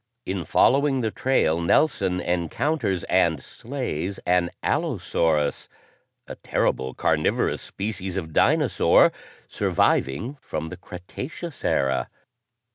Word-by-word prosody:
In 95 Hz, -3 st, -3 dB
following 135 Hz, -, +3 dB
the 110 Hz, -2 st, -1 dB
trail, 85 Hz, -12 st, +1 dB
Nelson 95 Hz, -, +2 dB
encounters 95 Hz, -, -1 dB
and 85 Hz, -5 st, +2 dB
slays 100 Hz, -, -5 dB
an 90 Hz, -1 st, +2 dB
allosaurus, 75 Hz, -3 st, 0 dB, 0.6 s
a -, -, -6 dB
terrible, 65 Hz, -1 st, -1 dB
carnivorous -, -, +1 dB
species 95 Hz, -2 st, -4 dB
of 80 Hz, -4 st, -5 dB
dinosaur -, -, +4 dB, 0.4 s
surviving 110 Hz, -, 0 dB
from 80 Hz, -6 st, -5 dB
the 90 Hz, -, -8 dB
Cretaceous 130 Hz, -, -8 dB
era. 65 Hz, -1 st, +1 dB
90 Hz, 100 wpm, -24 LUFS, 80-125 Hz, 0.6 s, dinosaur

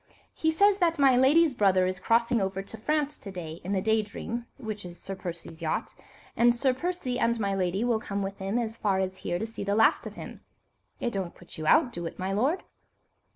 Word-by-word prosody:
He 320 Hz, -, 0 dB
says 400 Hz, +5 st, +4 dB
that 335 Hz, -2 st, +2 dB
my 270 Hz, -3 st, +5 dB
lady's 290 Hz, +4 st, +5 dB
brother 195 Hz, -5 st, +3 dB
is 185 Hz, 0 st, -2 dB
crossing 230 Hz, +1 st, +2 dB
over 195 Hz, 0 st, -2 dB
to 200 Hz, -, -9 dB
France 300 Hz, +5 st, -1 dB
to 200 Hz, -, -9 dB
day 170 Hz, -3 st, -7 dB
in 185 Hz, -, -4 dB
the 190 Hz, -2 st, 0 dB
Day 220 Hz, 0 st, +3 dB
Dream, 230 Hz, +3 st, -6 dB
which 215 Hz, -5 st, -5 dB
is 175 Hz, -1 st, -9 dB
Sir 195 Hz, -, -5 dB
Percy's 170 Hz, -3 st, -8 dB
yacht, 160 Hz, -1 st, -2 dB, 0.4 s
and 240 Hz, +1 st, +4 dB
Sir 255 Hz, +2 st, +2 dB
Percy 260 Hz, -4 st, -2 dB
and 235 Hz, 0 st, +1 dB
my 200 Hz, -2 st, 0 dB
lady 190 Hz, +2 st, 0 dB
will 240 Hz, -2 st, +2 dB
come 200 Hz, -3 st, -3 dB
with 195 Hz, 0 st, -5 dB
him 195 Hz, +4 st, -1 dB
as 230 Hz, -1 st, -2 dB
far 200 Hz, -4 st, +1 dB
as 190 Hz, 0 st, -2 dB
here 175 Hz, -, -2 dB
to 220 Hz, -, -2 dB
see 225 Hz, -2 st, -6 dB
the 200 Hz, 0 st, 0 dB
last 225 Hz, +1 st, +4 dB
of -, -, -9 dB
him. -, -, -9 dB, 0.6 s
It 240 Hz, -, -2 dB
don't 190 Hz, -3 st, -3 dB
put 175 Hz, -, -13 dB
you 155 Hz, -, -3 dB
out, 255 Hz, -, +5 dB
do 170 Hz, -1 st, -4 dB
it, -, -, -9 dB
my 190 Hz, +1 st, -2 dB
lord?" 275 Hz, -, +1 dB
220 Hz, 230 wpm, -28 LUFS, 190-250 Hz, 0.6 s, my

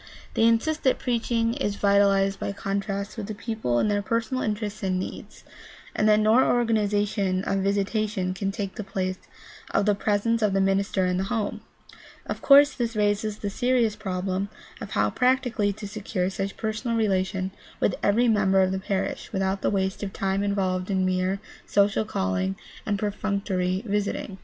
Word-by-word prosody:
They 225 Hz, -, +3 dB
insist 305 Hz, +8 st, +2 dB
that 260 Hz, -, +3 dB
preaching 230 Hz, -1 st, 0 dB
is 220 Hz, -7 st, -2 dB
vitalized 200 Hz, -1 st, +3 dB
by -, -, -3 dB
contact 200 Hz, +1 st, -3 dB
with 210 Hz, -3 st, -4 dB
the 215 Hz, -, -5 dB
people 220 Hz, -, -2 dB
in 120 Hz, -, +2 dB
their 205 Hz, -1 st, +1 dB
personal 230 Hz, +5 st, -1 dB
interests 210 Hz, -1 st, -3 dB
and 185 Hz, -2 st, 0 dB
needs, 185 Hz, -, -7 dB, 0.5 s
and 215 Hz, -, +3 dB
that 210 Hz, 0 st, +5 dB
no 220 Hz, +4 st, +5 dB
organization 205 Hz, -4 st, +1 dB
of 195 Hz, 0 st, 0 dB
visitation 200 Hz, -1 st, 0 dB
can 195 Hz, +1 st, -2 dB
take 195 Hz, -1 st, -4 dB
the 215 Hz, -, -3 dB
place 185 Hz, -1 st, -3 dB, 0.5 s
of 200 Hz, -, +1 dB
the 210 Hz, -, +4 dB
pres 205 Hz, +1 st, 0 dB
ence 230 Hz, 0 st, +2 dB
of 210 Hz, -2 st, +2 dB
the 195 Hz, -, +2 dB
minister 195 Hz, 0 st, +1 dB
in 180 Hz, 0 st, 0 dB
the 190 Hz, -, -1 dB
home. 215 Hz, -1 st, -2 dB, 0.6 s
Of -, -, -5 dB
course 285 Hz, +1 st, +7 dB
this 235 Hz, -3 st, -2 dB
raises 210 Hz, 0 st, 0 dB
the 205 Hz, -1 st, -4 dB
serious 245 Hz, -2 st, +1 dB
problem 190 Hz, -1 st, -2 dB, 0.3 s
of 215 Hz, -, -6 dB
how 105 Hz, 0 st, +2 dB
practically 250 Hz, -5 st, +1 dB
to 205 Hz, +1 st, -7 dB
secure 195 Hz, -3 st, -2 dB
such 195 Hz, +1 st, -4 dB
personal 225 Hz, +1 st, -2 dB
relation 190 Hz, -3 st, 0 dB, 0.3 s
with 195 Hz, -, +2 dB
every 230 Hz, +4 st, +3 dB
member 195 Hz, -4 st, +4 dB
of 185 Hz, -, +1 dB
the 190 Hz, -, -1 dB
parish 190 Hz, 0 st, -3 dB
without 195 Hz, -1 st, -1 dB
the -, -, +1 dB
waste 190 Hz, -1 st, -1 dB
of 200 Hz, -2 st, -3 dB
time 195 Hz, 0 st, -1 dB
involved 190 Hz, -2 st, -1 dB
in 190 Hz, -1 st, +1 dB
mere 185 Hz, +1 st, 0 dB, 0.3 s
social 205 Hz, +2 st, +2 dB
calling 95 Hz, -, -1 dB, 0.3 s
and 205 Hz, -1 st, +1 dB
perfunctory 200 Hz, -2 st, -1 dB
visiting. 200 Hz, -2 st, -2 dB
200 Hz, 175 wpm, -25 LUFS, 190-215 Hz, 0.6 s, course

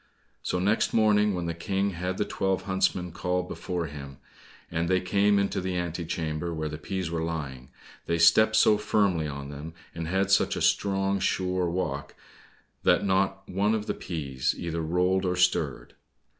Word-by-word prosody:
So -, -, -1 dB
next 100 Hz, +5 st, +1 dB
morning 105 Hz, -2 st, +4 dB
when 90 Hz, -1 st, -3 dB
the 85 Hz, -, -2 dB
King 95 Hz, +3 st, -1 dB
had 90 Hz, +1 st, -3 dB
the 105 Hz, -, 0 dB
twelve 95 Hz, -1 st, -1 dB
huntsmen 95 Hz, -2 st, 0 dB
called 90 Hz, +1 st, -2 dB
before 90 Hz, -2 st, -3 dB
him, 70 Hz, -2 st, -8 dB, 0.5 s
and 85 Hz, +1 st, -1 dB
they 95 Hz, 0 st, +3 dB
came 100 Hz, +3 st, +2 dB
into 100 Hz, -1 st, 0 dB
the 90 Hz, 0 st, -2 dB
ante 85 Hz, -1 st, -3 dB
chamber 80 Hz, +1 st, -3 dB
where 80 Hz, -1 st, -3 dB
the 75 Hz, 0 st, -6 dB
peas 90 Hz, +1 st, -3 dB
were 85 Hz, -1 st, -1 dB
lying, 70 Hz, -6 st, -4 dB, 0.4 s
they 85 Hz, -, +1 dB
stepped 110 Hz, +7 st, +5 dB
so 105 Hz, -1 st, +5 dB
firmly 95 Hz, -7 st, +1 dB
on 70 Hz, -1 st, -6 dB
them, 75 Hz, +3 st, -8 dB, 0.2 s
and 85 Hz, -1 st, -4 dB
had 95 Hz, +3 st, 0 dB
such -, -, +3 dB
a -, -, -3 dB
strong, 100 Hz, 0 st, +2 dB
sure 90 Hz, -2 st, 0 dB
walk, 90 Hz, +2 st, -3 dB, 0.7 s
that -, -, +3 dB
not 95 Hz, 0 st, +1 dB
one 100 Hz, +4 st, +1 dB
of 105 Hz, -1 st, -3 dB
the -, -, -1 dB
peas 70 Hz, -7 st, -2 dB
either 85 Hz, -1 st, -3 dB
rolled 90 Hz, +4 st, +1 dB
or 90 Hz, -1 st, 0 dB
stirred. 90 Hz, -8 st, +1 dB
90 Hz, 175 wpm, -27 LUFS, 80-95 Hz, 0.7 s, stepped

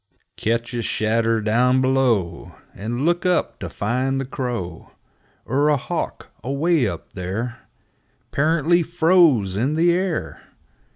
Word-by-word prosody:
4 90 Hz, -, -42 dB, 0.2 s
Ketch 115 Hz, +2 st, -1 dB
a 120 Hz, -, -1 dB
shadder 115 Hz, +1 st, 0 dB
down 125 Hz, +4 st, +3 dB
below, 125 Hz, -10 st, +1 dB, 0.2 s
And 120 Hz, +7 st, -3 dB
look 175 Hz, +1 st, +1 dB
up 180 Hz, -1 st, 0 dB
to -, -, -5 dB
find 130 Hz, +5 st, -1 dB
the 135 Hz, -, -2 dB
crow 120 Hz, -, -5 dB, 0.5 s
Er 140 Hz, +4 st, +2 dB
a 150 Hz, -, +3 dB
hawk, 125 Hz, -, -5 dB
away 140 Hz, +2 st, +1 dB
up 85 Hz, -5 st, -7 dB
there 110 Hz, +7 st, -4 dB, 0.7 s
'Pearantly 160 Hz, +3 st, +2 dB
froze 165 Hz, -, +3 dB
in 130 Hz, +9 st, 0 dB
the 170 Hz, +2 st, +4 dB
air 180 Hz, -1 st, -2 dB
125 Hz, 130 wpm, -22 LUFS, 110-155 Hz, 0.7 s, the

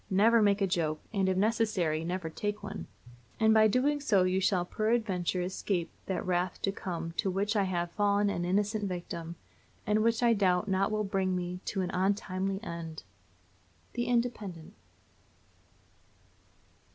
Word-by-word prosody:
Never 220 Hz, +4 st, +5 dB
make 205 Hz, -1 st, +3 dB
a -, -, +4 dB
joke, 165 Hz, -5 st, 0 dB
and, 195 Hz, -2 st, +2 dB
if 185 Hz, -, +1 dB
necessary, 195 Hz, -7 st, +1 dB
never 175 Hz, 0 st, -3 dB
take 205 Hz, +5 st, -4 dB
one; 200 Hz, -, -6 dB, 0.5 s
and 220 Hz, -1 st, +5 dB
by 220 Hz, 0 st, +6 dB
so -, -, 0 dB
doing 285 Hz, +6 st, +1 dB, 0.3 s
you 190 Hz, -, +1 dB
shall 185 Hz, -2 st, +2 dB
peradventure 200 Hz, -5 st, 0 dB
escape 180 Hz, -1 st, -2 dB, 0.2 s
that 190 Hz, -, -2 dB
wrath 180 Hz, 0 st, 0 dB
to 195 Hz, -, +2 dB
come 170 Hz, -4 st, -5 dB
to 200 Hz, -, +1 dB
which 200 Hz, +4 st, 0 dB
I 200 Hz, -2 st, +3 dB
have 175 Hz, -2 st, -2 dB
fallen 205 Hz, +1 st, +2 dB
an 175 Hz, -, -2 dB
innocent 205 Hz, +4 st, 0 dB
victim, 170 Hz, -2 st, -5 dB, 0.5 s
and 210 Hz, +1 st, +2 dB
which 230 Hz, +1 st, +2 dB
I 235 Hz, -1 st, +5 dB
doubt 185 Hz, -3 st, +2 dB
not 195 Hz, 0 st, +1 dB
will 215 Hz, 0 st, 0 dB
bring 190 Hz, -2 st, 0 dB
me 180 Hz, 0 st, -3 dB
to 195 Hz, -, -1 dB
an 180 Hz, 0 st, -2 dB
untimely 195 Hz, 0 st, 0 dB
end. 170 Hz, -4 st, -6 dB, 0.9 s
_The 240 Hz, 0 st, -2 dB
Independent. 225 Hz, -9 st, -2 dB
195 Hz, 155 wpm, -30 LUFS, 180-215 Hz, 0.9 s, by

